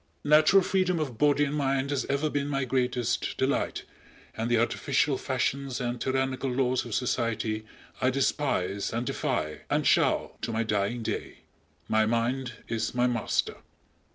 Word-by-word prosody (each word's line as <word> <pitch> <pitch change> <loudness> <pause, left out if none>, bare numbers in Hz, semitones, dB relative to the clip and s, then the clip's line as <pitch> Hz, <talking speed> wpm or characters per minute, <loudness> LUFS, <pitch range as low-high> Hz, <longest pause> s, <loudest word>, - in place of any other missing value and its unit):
Natural 155 +6 +6
freedom 185 -1 +1
of 130 -7 -4
body 145 0 +4
and 140 - -3
mind 135 -1 0
has 140 - 0
ever 140 +2 0
been 145 -1 -1
my 135 -2 -1
greatest 125 -2 -1
delight 135 +1 0 0.5
and 115 +1 -2
the 120 - +3
artificial 135 +4 +1
fashions 130 0 -2
and 120 -1 -3
tyrannical 130 0 0
laws 125 -1 +1
of 120 - -4
society 110 -3 -1 0.3
I 130 - +4
despise 125 -8 0
and 115 +2 -2
defy, 75 -8 -2
and - - +1
shall - - +2
to - - -2
my 115 0 0
dying 105 +2 -1
day. - - -4 0.5
My 110 0 +3
mind 120 +2 0
is 115 +1 -2
my 125 0 +3
master. 120 -3 0
130 Hz, 155 wpm, -28 LUFS, 115-140 Hz, 0.5 s, Natural